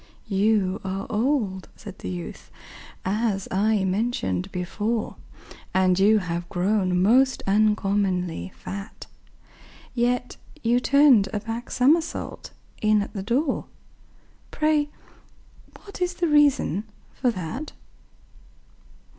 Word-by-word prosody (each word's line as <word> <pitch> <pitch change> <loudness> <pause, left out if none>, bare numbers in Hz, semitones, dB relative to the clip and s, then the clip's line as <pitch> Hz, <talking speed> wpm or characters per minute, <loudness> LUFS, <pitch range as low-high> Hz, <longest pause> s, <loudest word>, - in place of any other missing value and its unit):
"You 200 -1 +1
are 195 0 -3
old," 215 -5 0
said 200 -3 -11
the 90 - -5
youth, 90 -2 -7 0.6
"as 200 0 0
I 205 +1 +2
mentioned 190 - -1
before, 210 +5 -2 0.6
And 185 -1 +3
you 210 +3 +5
have 175 -3 -3
grown 185 -1 +1
most 255 +7 +3
uncommonly 195 - +1
fat; 200 +2 -8 0.9
Yet 245 0 0 0.3
you 240 +1 +3
turned 265 -7 +5
a 210 - -1
back 225 +3 -6
somersault 315 +6 +1 0.3
in 215 -1 +3
at - - -10
the 200 - -4
door 260 +8 0 0.8
Pray 305 -1 +1 0.9
what 400 -2 -11
is 360 0 0
the 345 -1 0
reason 285 - +3 0.3
for 255 - 0
that?" 225 - -5
210 Hz, 105 wpm, -24 LUFS, 190-250 Hz, 0.9 s, you